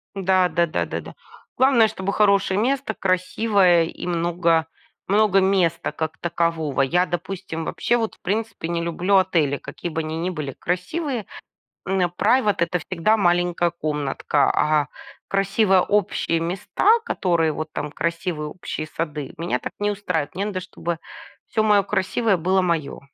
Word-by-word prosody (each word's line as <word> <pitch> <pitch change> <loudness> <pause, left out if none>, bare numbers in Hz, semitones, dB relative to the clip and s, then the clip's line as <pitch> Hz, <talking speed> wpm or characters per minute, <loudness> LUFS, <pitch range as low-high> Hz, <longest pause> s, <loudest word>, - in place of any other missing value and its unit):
Да, 185 -1 +2
да, 170 0 +2
да, 155 - -2
да, - - -4
да. - - -11 0.4
Главное, 255 -3 +5
чтобы 200 -2 -3
хорошее 200 -2 +3
место, 260 -1 0
красивое, 185 -1 +2
и - - -7
много 170 -1 +1 0.4
много 205 0 +4
места 190 -3 +1
как 160 -1 -4
такового. 165 -4 -1
Я, 175 +7 +2
допустим, 175 -1 -5
вообще, 240 - 0
вот, 225 -2 -1
в - - -34
принципе, 215 -3 -2
не 170 0 -1
люблю 175 +4 0
отели, 170 -7 +3
какие 140 +5 -7
бы 160 0 -2
они 155 +1 -4
ни 175 +2 -1
были 150 -6 -4
красивые. 225 - -3 0.6
М, 190 +1 0 0.2
private- 210 +1 +3
это 170 +1 +1
всегда 185 +6 +1
маленькая 175 -2 +2
комнатка, 150 -3 0
а 150 -2 +2 0.4
красивые 195 0 +3
общие 200 -5 0
места, 195 - +2
которые 170 - +1
вот 155 +1 -5
там, 145 0 -4
красивые 170 0 -2
общие 155 -2 -6
сады, 150 -3 -5
меня 165 -6 -1
так - - -6
не 205 0 +1
устраивает. 180 -7 -2
Мне 195 +2 -2
надо, 195 -3 -3
чтобы 170 -2 -4 0.5
всё 220 - +1
моё 210 -2 +4
красивое 200 +2 +1
было 185 +3 +2
моё. 165 -6 -1
180 Hz, 155 wpm, -22 LUFS, 165-200 Hz, 0.6 s, Главное